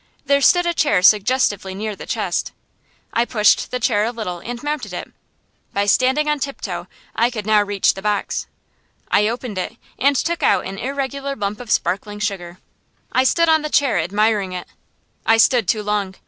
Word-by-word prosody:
There 280 0 +3
stood 355 +5 +4
a 345 - +1
chair 205 - +2
suggestively 205 -2 +3
near 210 +1 -4
the - - -10
chest. - - -2 0.6
I 235 - +3
pushed 215 -3 +2
the 250 - -3
chair 220 -4 +2
a 230 - 0
little 215 -7 -5
and 240 +6 -7
mounted 295 -1 -3
it. - - -6 0.6
By 200 0 +1
standing 260 +8 +2
on 300 -1 +1
tiptoe 275 0 -5 0.3
I 235 +2 +3
could 220 -4 -6
now 215 -1 +4
reach 205 -1 +1
the 195 - -8
box. 210 0 -2 0.6
I 210 +1 +4
opened 230 -3 -4
it 215 +5 -5 0.2
and 280 +1 +3
took 335 +5 -1
out - - +2
an 195 +1 -6
irregular 275 +1 -3
lump 205 -3 -3
of 245 -3 -9
sparkling 205 +1 -1
sugar. 190 -5 -4 0.5
I 255 - +3
stood 335 +5 +3
on 315 -1 +4
the 305 - -3
chair 280 - +2
admiring 205 +2 0
it. 180 -1 -6 0.6
I 225 - +4
stood 225 -2 +4
too 215 +1 +1
long. 205 -2 -2
220 Hz, 185 wpm, -20 LUFS, 205-270 Hz, 0.6 s, stood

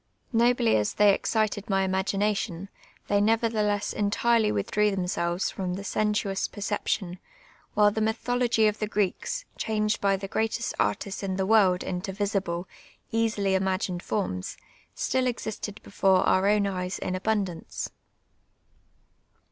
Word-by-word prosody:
Nobly 235 0 +4
as 105 -1 -1
they 205 -1 +6
excited 215 -1 -1
my 195 -1 +2
imagination, 195 0 -1 0.4
they 205 0 +2
ncver 225 +2 +2
thelcKS 210 -2 0
entirely 220 +2 +2
withdri'W 205 - +1
themselves 180 -1 -1
from 180 -2 -3
the 200 - -6
sensuous 210 -1 0
jK'r 205 0 -3
ception, 180 -3 -2 0.6
while 210 -1 +5
the 220 - -2
mythology 230 +1 +1
of 210 0 +1
the 215 - -1
Cireeks, 210 - -1
changed 215 -1 0
by 195 -1 +2
the 195 0 -6
greutist 220 +2 -1
artists 105 - -1
in 190 -2 -2
the 190 0 0
world 195 -4 +4
into 180 +2 -3
visible, 195 -3 -2 0.4
easily 220 -4 +1
imagined 190 -1 0
forms, 180 - -3 0.4
still 260 0 0
existed 220 -3 -4
before 190 -1 +3
our 190 +1 +3
own 210 -1 +3
eyes 185 -1 -2
in 185 - -3
abundance. 190 -3 -2
205 Hz, 135 wpm, -27 LUFS, 190-220 Hz, 0.6 s, they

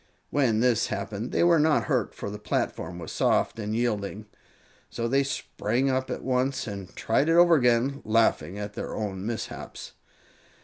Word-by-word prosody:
When 120 -6 +2
this 120 -3 +3
happened 105 +3 -4
they - - +2
were 170 -1 +5
not 155 0 +3
hurt, 125 -8 -1
for 100 - -5
the 105 - -7
platform 90 -3 -2
was 85 -2 -7
soft 115 - +1
and 105 0 -2
yielding; 110 -3 -2 0.6
so 115 - -3
they 135 +3 +3
sprang 135 -1 -1
up 130 0 -1
at - - -4
once 130 0 0
and 100 -4 -6
tried 135 +7 +1
it - - +4
over 175 0 +7
again, 125 0 +2
laughing 110 -5 +1
at 105 0 -5
their - - -5
own 95 -3 -4
mishaps. 115 -1 -6
115 Hz, 170 wpm, -27 LUFS, 105-135 Hz, 0.6 s, over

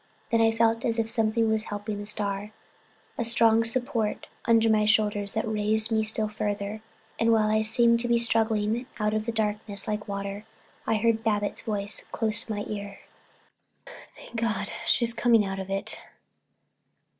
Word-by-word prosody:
Then 230 0 +3
I 225 0 +4
felt 225 0 +1
as 230 -2 0
if 225 -1 0
something 225 0 +1
was 220 0 0
helping 205 0 -5
the 205 - -7
star, 205 0 -3 0.7
a - - +1
strong 230 -1 +4
support 230 -2 -1 0.2
under 230 -1 +4
my 215 -1 +3
shoulders 210 -1 +1
that 220 +1 -1
raised 215 +1 +1
me 220 -1 +2
still 215 0 -1
further, 205 0 -3 0.4
and 230 0 +3
while 215 -1 +3
I 215 0 +3
seemed 235 +2 +3
to 240 - -2
be 235 0 +3
struggling 225 0 +1
out 210 0 0
of 215 +1 -2
a - - 0
darkness 210 -2 -2
like 210 0 -3
water, 200 0 -5 0.4
I 225 - +2
heard 225 +1 +1
Babbitts' 205 -2 -1
voice 205 -1 -2
close 225 +1 0
to 225 - -6
my 205 - -3
ear: 200 -1 -6 1.1
"Thank 235 - -10
God, 225 -1 -1 0.2
she's 235 -1 +4
coming 230 -3 +3
out 195 0 -4
of 190 0 -6
it." 195 0 -3
220 Hz, 170 wpm, -27 LUFS, 210-230 Hz, 1.1 s, I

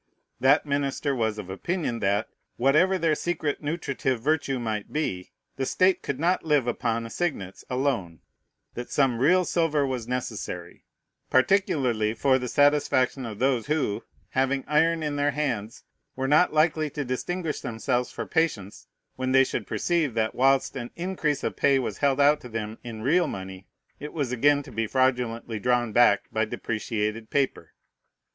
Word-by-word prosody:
That 135 +4 +4
minister 140 0 -1
was 110 -3 -1
of 105 -4 -6
opinion, 135 - -2
that, 100 +1 +1 0.3
whatever 155 +9 +3
their 165 -3 +2
secret 155 -2 -2
nutritive 140 -5 -2
virtue 140 +1 0
might 110 -4 -4
be, 95 -12 -2 0.3
the 135 - -1
state 185 0 +3
could 140 -1 -4
not 175 +3 +1
live 150 -5 +2
upon 115 -1 -1
assignats 115 - -3
alone, 125 - -1 0.5
that 120 - -6
some 130 -5 +1
real 180 +7 +4
silver 155 -5 +1
was 125 -4 -3
necessary, 125 0 -5 0.4
particularly 130 - +2
for 130 +3 +3
the 125 - -4
satisfaction 140 -2 +2
of 110 -2 -7
those 130 -1 +1
who, 150 -9 -1 0.3
having 135 +1 0
iron 160 +2 +2
in 145 -1 -2
their 145 0 +2
hands, 125 -7 -3 0.3
were 130 0 -2
not 155 +6 +4
likely 155 0 +2
to 145 0 -4
distinguish 160 +6 -3
themselves 120 +2 -2
for - - -5
patience, 130 - -1 0.3
when 130 0 -1
they 135 0 +7
should - - -3
perceive, 165 -8 0
that, 110 -1 0
whilst 135 +2 +2
an 120 -2 -5
increase 170 -5 -2
of - - -2
pay 140 -1 +3
was 130 - -3
held 140 -1 +2
out 145 +1 +4
to 125 - -10
them 110 -1 -5
in 110 -2 -7
real 170 +6 +3
money, 95 -3 -7 0.3
it 150 - -7
was 145 -6 -2
again 145 +4 +3
to 135 - -12
be 115 -1 -2
fraudulently 120 -3 0
drawn 120 0 +1
back 105 -4 +5
by 110 - +1
depreciated 110 0 -3
paper. 140 -2 -1
135 Hz, 160 wpm, -26 LUFS, 115-150 Hz, 0.5 s, they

